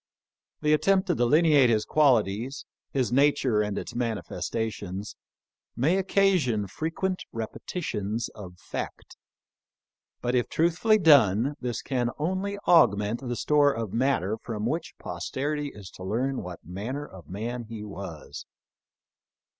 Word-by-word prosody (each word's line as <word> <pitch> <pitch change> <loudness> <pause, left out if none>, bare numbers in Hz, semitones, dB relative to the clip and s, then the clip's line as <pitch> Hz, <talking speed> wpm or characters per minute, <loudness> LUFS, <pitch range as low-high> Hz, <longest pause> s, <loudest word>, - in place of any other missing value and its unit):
The 150 0 +4
attempt 190 +5 +3
to - - +4
delineate 145 +1 +4
his 110 -2 +2
qualities, 125 -3 +2 0.3
his 130 -3 0
nature 135 -4 +3
and 105 -1 -2
its - - -5
manifestations, 105 -3 -3 0.6
may 155 +10 +2
occasion 185 - +2
frequent 165 - -3
repe 115 -2 -5
titions 110 - -2
of 90 -4 -10
fact, - - -7 1.0
but 120 0 -1
if 125 -1 +1
truthfully 175 +7 +3
done 140 - +5
this 120 -2 -3
can 125 -3 0
only 190 +6 -2
augment 105 - +4
the 120 -2 -3
store 145 +2 +3
of 115 -6 -4
matter 115 -5 +1
from 110 -2 -4
which 160 +8 -2
posterity 140 - -3
is 105 -8 -10
to 95 - -11
learn 125 +7 -1
what 90 -2 -9
manner 110 - -5
of 90 - -13
man 115 +5 -4
he 110 -1 -7
was. 95 -6 -8
120 Hz, 130 wpm, -27 LUFS, 105-150 Hz, 1.0 s, done